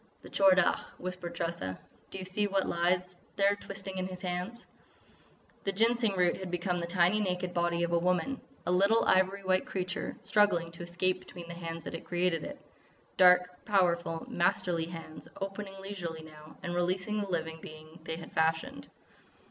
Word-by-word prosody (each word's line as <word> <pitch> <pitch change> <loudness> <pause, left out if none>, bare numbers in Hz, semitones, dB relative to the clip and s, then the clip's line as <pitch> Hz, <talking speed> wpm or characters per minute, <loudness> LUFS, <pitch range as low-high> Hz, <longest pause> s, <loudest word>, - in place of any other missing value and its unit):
"The - - -10
Tchor 195 -1 +6
Dagh!" 190 -2 +3 0.2
whispered 180 -1 -5
Tressa. 165 - -3 0.3
"Do - - -5
you 190 - -5
see 205 +3 0
what 195 -1 +1
lies 180 +1 +1 0.4
twisting 195 -1 -6
there 185 - 0
in 185 - -4
his 185 -1 -7
hands?" 185 +6 -3 1.0
The 195 - +1
Ginseng 225 +1 +3
root 180 -1 +3
had 190 -1 -6
become 180 0 -1
the 170 - -3
tiny 180 +3 +3
naked 180 -2 -1
body 170 0 +1
of 170 - 0
a 170 - +3
woman—a 180 +5 -1
little 200 +5 +4
ivory 190 +1 +3
white 185 0 +2
creature, 185 -1 -3
struggling 180 -6 +3
to 170 - -11
escape 180 +2 0
between 175 -2 -10
the 170 - -6
hands 165 -1 -5
that - - -6
had 165 - -5
created 175 -1 +1
it—dark, 180 -10 +1
powerful, 170 -5 +1
masterly 170 -1 +1
hands, 165 -2 -9
opening 195 0 -5
leisurely 175 -5 -5
now, 155 0 -13
and 175 - -3
releasing 185 +4 0
the 200 - -3
living 160 -2 -2
being 155 +2 -11
they 160 - -3
had 165 - -9
fashioned. 160 - 0
180 Hz, 170 wpm, -31 LUFS, 170-195 Hz, 1.0 s, Tchor